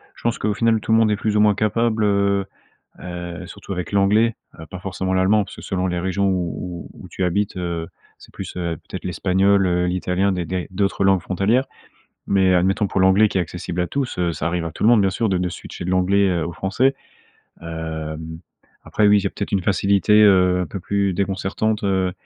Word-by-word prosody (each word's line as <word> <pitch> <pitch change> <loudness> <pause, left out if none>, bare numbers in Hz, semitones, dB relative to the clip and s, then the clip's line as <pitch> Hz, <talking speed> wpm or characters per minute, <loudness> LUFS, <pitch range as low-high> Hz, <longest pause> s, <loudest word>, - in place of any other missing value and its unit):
je - - -16
pense 115 0 0
qu'au 105 - -1
final 115 +1 +2
tout - - -3
le 110 - +6
monde 110 -1 +3
est - - +2
plus 105 +1 -2
ou - - +3
moins 105 -1 +4
capable, 110 +1 0
heu 100 -1 +2 0.6
heu, 90 0 -7
surtout 95 - -9
avec 90 +1 -5
l'anglais, 105 +3 +3 0.2
heu, 80 - -9
pas 90 +4 -9
forcément 95 0 -3
l'allemand, 100 +3 +3
parce - - -12
que - - -10
selon 95 -1 -2
les 90 -1 -1
régions 95 +2 0
où 90 -1 -3
où - - -14
où - - -10
tu - - -5
habites, 100 +3 -1
heu, 85 -2 -3 0.3
c'est - - -17
plus, - - -7
heu, 85 -2 -2
peut-être - - -7
l'espagnol, 95 +3 +2
heu, 90 0 +1
l'italien, 90 +2 0
des 90 -2 -2
des 90 +1 -3
d'autres 100 0 0
langues 95 -1 +4
frontalières 100 +10 +1 0.6
mais 95 -2 +3
admettons 95 +4 +2
pour 95 - -1
l'anglais 95 +3 +5
qui 100 - -1
est - - +2
accessible 85 +1 -4
à 90 - -1
tous, 140 -3 -3
heu, 85 -1 +1
ça 75 0 -3
arrive 85 0 -1
à 85 - -4
tout 80 - -5
le - - +6
monde, 120 -3 +5
bien 95 -1 +2
sûr, 110 +4 -1
de 95 -2 +1
de 90 0 -1
switcher 90 0 -8
de 90 - -2
l'anglais, 95 +2 +3
heu, 85 -3 -1
au 85 - -5
français, 100 - +1 0.7
hem, 80 -1 -6 0.4
après, 105 - +1
oui, 105 0 +5
j'ai 100 0 -1
peut-être 100 - -5
une 100 - +1
facilité, 100 +2 +2
heu, 90 -3 +4
un - - -1
peu 95 - -6
plus 100 +1 0
déconcertante, 100 +3 -1
heu 95 -2 +1
95 Hz, 225 wpm, -21 LUFS, 90-100 Hz, 0.7 s, le